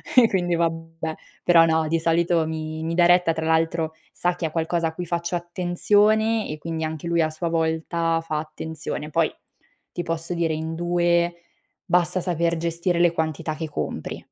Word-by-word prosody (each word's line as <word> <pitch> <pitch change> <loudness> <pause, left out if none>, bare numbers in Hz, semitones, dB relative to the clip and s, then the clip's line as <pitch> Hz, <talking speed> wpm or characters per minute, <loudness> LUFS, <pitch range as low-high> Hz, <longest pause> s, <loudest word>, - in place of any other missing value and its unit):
e 245 -3 +8
quindi 175 -2 +1
vabbè. 165 -1 -2 0.3
Però 170 -2 +6
no, 160 -1 +2
di 165 0 +2
solito 165 0 +2
mi 155 0 -4
mi 165 +1 -2
dà 175 -1 +5
retta. 175 -1 +4
Tra 160 0 -3
l'altro 160 0 +1 0.2
sa 175 0 0
che 175 - -3
è - - -8
qualcosa 165 0 0
a 160 - -5
cui 180 - -4
faccio 170 +1 -2
attenzione 205 +6 +2
e 150 - -5
quindi 160 0 -3
anche 160 +1 -5
lui 170 0 +2
a 155 - +2
sua 165 +2 -3
volta 165 0 0
fa 155 -2 -2
attenzione. 155 -1 -5
Poi 165 0 +2 0.6
ti 175 - -3
posso 165 +1 -3
dire 165 -2 0
in 160 +1 -3
2 175 0 +1 0.4
basta 180 +1 +2
saper 170 -1 0
gestire 170 +1 -1
le 175 -1 +5
quantità 160 -1 -2
che 160 0 -4
compri. - - -4
165 Hz, 180 wpm, -24 LUFS, 160-175 Hz, 0.6 s, e